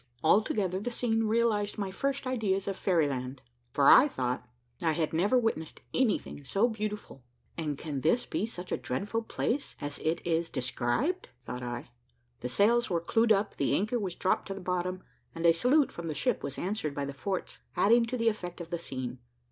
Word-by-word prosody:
Altogether 190 +1 +3
the 210 - -3
scene 225 -2 0
realised 215 -2 +1
my 200 -2 -2
first 275 +6 -2
ideas 210 -7 0
of 195 - -1
fairy 170 -6 +2
land, 130 -1 -4 0.3
for 140 +2 +3
I 285 - +9
thought 125 - -2 0.4
I 160 -2 +2
had 160 -1 -1
never 200 +10 +3
witnessed 225 -10 -1
anything 230 - 0
so 200 - +2
beautiful. 210 - -5 0.3
"And 150 -4 -2
can 145 -3 -4
this 235 - +2
be 215 - -1
such 180 -5 -7
a - - +1
dreadful 205 - -2
place 250 +4 -2
as 145 0 -4
it 165 +2 0
is 165 0 +1
described?" 125 - -1 0.2
thought 125 0 -5
I. 120 0 -5 0.5
The 125 - -4
sails 230 - +3
were 170 - +1
clewed 225 +7 +2
up, 210 0 +2
the - - +2
anchor 220 +5 0
was 190 -5 -3
dropped 185 - 0
to 195 - -4
the - - -6
bottom, 180 0 -2 0.3
and 165 +1 -3
a 165 - +7
salute 260 - +3
from 170 -1 -6
the 155 - -3
ship 250 - 0
was 140 - -5
answered 180 -7 -2
by 140 - -1
the 140 - -5
forts, 185 +6 -4 0.2
adding 230 +3 +5
to 250 +2 -2
the 230 -1 +1
effect 180 -5 -5
of 170 0 -8
the 170 - -1
scene. 130 -5 -5
185 Hz, 195 wpm, -30 LUFS, 155-225 Hz, 0.5 s, I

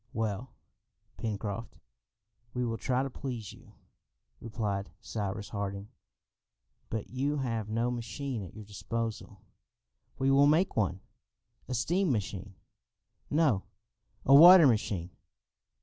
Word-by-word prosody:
"Well, 110 +1 -2 0.7
Pencroft, 105 0 -4 0.8
we 125 0 0
will 115 -1 -3
try 130 0 0
to 135 - -3
please 120 -6 -6
you," - - -17 0.7
replied 105 -5 -3
Cyrus 105 -2 -4
Harding. 100 0 -4 1.0
"But 110 -1 -4
you 140 +4 -1
have 115 -5 -2
no 115 +3 0
machine 120 +1 -4
at 95 -1 -9
your 110 -1 -9
disposal." 115 +2 -5 0.7
"We 135 +1 +2
will 140 +1 +6
make 160 +6 +3
one." 95 -3 0 0.7
"A 130 - -2
steam 175 +7 +1
machine?" 100 -3 -3 0.7
"No, 145 -10 +3 0.6
a 135 - +5
water 170 +3 +10
machine." 105 -8 +1
115 Hz, 115 wpm, -30 LUFS, 105-135 Hz, 1.0 s, water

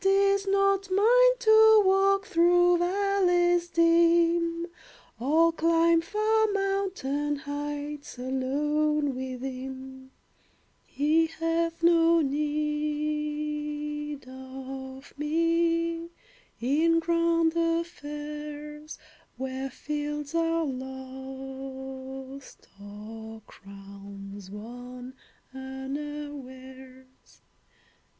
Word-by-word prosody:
It - - +2
is 395 0 +3
not 395 0 +2
mine - - +5
to 440 -2 +6
walk 390 +1 +3
Through 350 +1 +4
valleys 355 -2 +2
dim, 335 0 +3 0.5
Or 320 +7 +3
climb 330 0 +3
far 435 +4 +1
mountain 385 -8 -1
heights 290 0 -5
Alone 290 +3 0
with 255 0 -6
him. 265 0 -7 0.8
He 315 +3 +2
hath 330 +1 -2
no 335 0 +5
need 300 0 -2
of 265 +1 -9
me 335 +2 +1 0.5
In 310 +7 +2
grand 335 0 +2
affairs, 300 -2 -4 0.4
Where 265 +1 -4
fields 295 +2 -4
are 330 0 +1
lost, 265 0 -8 0.2
or 220 +2 -9
crowns 200 0 -11
Won 245 +4 -9 0.4
unawares. 265 -1 -8
300 Hz, 70 wpm, -27 LUFS, 265-335 Hz, 0.8 s, to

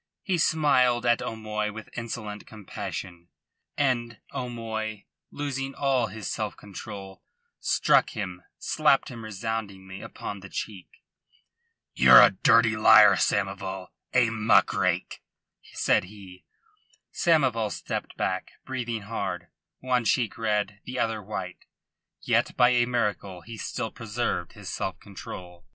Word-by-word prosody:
He 185 -4 0
smiled 130 -7 +3
at 120 -1 +3
O'Moy 105 -1 -3
with 110 +1 -10
insolent 110 -3 -6
compassion, 90 -4 -7 0.5
and 120 -5 0 0.2
O'Moy, 110 -4 -4 0.3
losing 135 -2 -4
all 135 -4 +1
his 105 -1 -7
self - - -3
control, 100 -1 -9 0.4
struck - - +3
him 90 -4 -4 0.2
slapped 150 -3 +2
him 120 -3 -8
resoundingly 100 -3 -5
upon 100 - -7
the 95 0 -11
cheek. 95 -3 -6 1.1
"Ye're - - +9
a - - +7
dirty 115 -1 +4
liar, 110 - +8
Samoval, 95 -2 -1 0.2
a 125 -3 +3
muck 110 0 +3
rake," - - -1 0.5
said - - +2
he. 95 -2 -13 0.7
Samoval 130 -10 +2
stepped - - -5
back, - - -2
breathing 120 -4 -3
hard, 95 -5 -4 0.3
one 125 -1 +1
cheek 115 0 +1
red, 105 -2 -1
the 125 - -6
other 115 -2 0
white. 95 -3 -6 0.6
Yet - - +1
by 125 - +6
a 120 -1 +3
miracle 105 -6 -2
he 115 +5 -9
still 110 +1 -4
preserved 115 +1 -3
his - - -11
self - - -3
control. 90 -2 -10
110 Hz, 125 wpm, -27 LUFS, 100-120 Hz, 1.1 s, Ye're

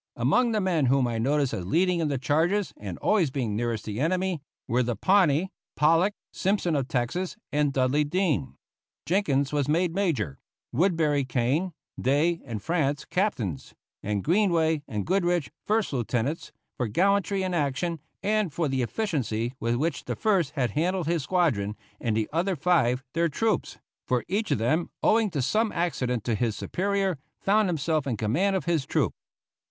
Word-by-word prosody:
Among 250 -2 +2
the 215 - +1
men 175 -8 +1
whom 135 0 +3
I 115 -2 -1
noticed 140 +3 +1
as 90 - -3
leading 175 - +2
in 160 - +1
the 140 -2 -1
charges 165 +9 +1
and 95 -4 -7
always 190 -9 +2
being 125 -6 -2
nearest 115 -1 -2
the 105 +1 -4
enemy, 180 +2 0 0.3
were 120 +2 +2
the 120 -1 -1
Pawnee, 185 - +3 0.2
Pollock, 165 +7 +3 0.2
Simpson 190 -4 0
of 135 -3 0
Texas, 140 +10 -2 0.2
and 145 -1 +2
Dudley 135 +2 +2
Dean. 150 -4 0 0.5
Jenkins 145 -5 +1
was 145 -2 +1
made 170 +2 +2
major, 140 - -1 0.3
Woodbury 155 -2 +2
Kane, 130 +8 0 0.3
Day, 155 +6 +2
and 110 -6 -5
Frantz 145 -4 0
captains, 120 - -2 0.3
and 100 -1 -2
Greenway 165 -4 +2
and 105 -2 -3
Goodrich 175 -3 +1 0.2
first 215 -5 +1
lieutenants, 125 - -2 0.3
for 125 - -1
gallantry 195 - +2
in 185 -1 -2
action, 160 +2 -1 0.2
and 210 -4 +1
for 160 +2 -1
the 135 -1 0
efficiency 125 - -1
with 115 +1 0
which 145 0 -1
the - - -3
first 185 -9 +1
had 125 -7 0
handled 175 - 0
his 165 0 0
squadron, 135 - +1 0.2
and 110 -2 0
the 110 - 0
other 180 +3 +1
five 135 -6 +2
their 170 0 +2
troops 220 +8 -1 0.3
for 125 -2 0
each 210 +4 -1
of - - +2
them, 155 +10 +1
owing 220 -1 +4
to 145 -7 -2
some 215 - +1
accident 125 -9 -1
to 120 - 0
his 110 0 0
superior, 195 -3 -1 0.2
found 210 0 +2
himself 155 -2 0
in 120 -5 -1
command 155 - +1
of 190 - -2
his 165 -5 0
troop. - - +1
155 Hz, 170 wpm, -27 LUFS, 125-185 Hz, 0.5 s, owing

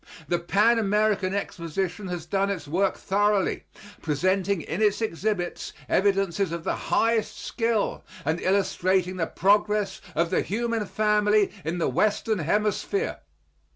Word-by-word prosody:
The 175 +2 +1
Pan 210 +7 +3
American 205 -2 +1
Exposition 180 0 -3
has 175 -3 -5
done 195 0 0
its 185 -6 -4
work 185 +6 +1
thoroughly, 205 0 +1 0.4
presenting 185 +4 0
in 170 +7 -4
its 210 -1 +3
exhibits 205 -3 -2
evidences 195 -2 +1
of 170 -1 -4
the - - -1
highest 225 -2 0
skill 230 -3 -1 0.2
and 160 +3 0
illustrating 185 -1 +1
the 165 -2 0
progress 205 0 +1
of 165 +2 +1
the - - +2
human 230 0 -2
family 210 -1 +2
in 165 +3 -2
the 170 - 0
Western 210 - +1
Hemisphere. 210 - 0
195 Hz, 130 wpm, -26 LUFS, 175-210 Hz, 0.4 s, Pan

